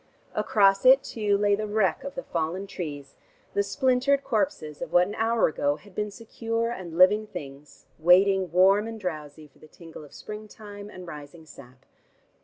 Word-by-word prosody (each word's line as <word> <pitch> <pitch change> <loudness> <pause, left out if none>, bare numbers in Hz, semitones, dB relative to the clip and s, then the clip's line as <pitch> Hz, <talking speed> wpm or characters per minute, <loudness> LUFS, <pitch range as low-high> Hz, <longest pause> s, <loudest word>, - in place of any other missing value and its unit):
Across 195 -2 +3
it 260 +2 +6
too 210 -3 0
lay 205 0 +2
the 215 +1 -1
wreck 205 -3 0
of 280 - -7
the 265 - -5
fallen 170 +4 -3
trees, 145 -7 -7 0.4
the 200 - +2
splintered 260 +6 +1
corpses 215 - -2
of - - -5
what 175 0 +5
an 205 - -6
hour 225 +1 +2
ago 145 -2 0
had 190 +6 -17
been 210 +2 -2
secure 230 +1 -3
and 175 -7 -7
living 210 +4 +5
things, 140 -4 -10
waiting, 185 +2 +4
warm 195 +4 +4
and 225 -1 -7
drowsy, 155 -5 -6
for 140 - -28
the - - -16
tingle 165 0 -12
of 145 - -15
springtime 210 -1 -10
and 185 -3 -10
rising 150 0 -11
sap. 135 -3 -16
195 Hz, 175 wpm, -26 LUFS, 160-215 Hz, 0.4 s, it